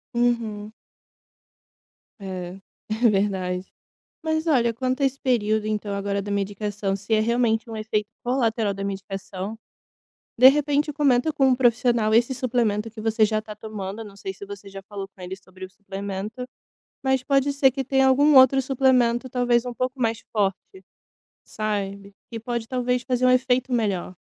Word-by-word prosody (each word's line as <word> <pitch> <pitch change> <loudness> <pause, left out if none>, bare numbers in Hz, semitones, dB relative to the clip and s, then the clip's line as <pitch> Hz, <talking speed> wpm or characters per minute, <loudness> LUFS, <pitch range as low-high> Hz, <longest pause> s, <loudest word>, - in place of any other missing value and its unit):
Uhum. 230 -3 0 1.5
É, 185 -2 -6 0.3
é 225 +2 +3
verdade. 190 -3 -1 0.6
Mas 315 0 -1
olha 235 -6 +3
quanto 255 +3 -2
a - - +5
esse 270 +1 -3
período 220 -4 +1
então 210 -1 -2
agora 200 0 -1
da 205 +1 -6
medicação 200 0 -2
se 200 +3 -2
é 215 - +3
realmente 230 0 +1
um 225 - -5
efeito 215 -1 -2 0.2
colateral 230 -5 0
da 195 - -6
medicação. 195 +1 -5 0.8
De 255 +2 +10
repente 295 +1 +2
comenta 285 0 +2
com 275 -3 +2
um 255 - +4
profissional 235 -3 +2
esse 240 +3 +3
suplemento 230 -4 0
que 220 0 -10
você 220 0 +2
já 215 0 +1
tá 215 -1 -10
tomando, 210 0 -6
não 205 -2 -12
sei 190 -1 -5
se 200 - -10
você 200 0 -9
já 195 0 -9
falou 195 0 -7
com 195 -1 -16
ele 180 +1 -5
sobre 185 0 -12
o 185 - -10
suplemento, 200 +4 -6 0.6
mas 265 -1 +1
pode 275 0 +2
ser 275 -1 +4
que 270 +1 -3
tenha 265 0 +3
algum 285 +3 +5
outro 265 +1 +7
suplemento 255 -2 +2
talvez 245 -2 +2
pouco 255 +1 -2
mais 225 -1 -1
forte, 195 -2 -2 0.6
sabe? 200 -2 -4 0.2
E 230 - -5
pode 235 0 -4
talvez 250 0 0
fazer 255 -1 0
um - - +6
efeito 255 0 +2
melhor. 200 -6 -1
225 Hz, 165 wpm, -24 LUFS, 200-255 Hz, 1.5 s, De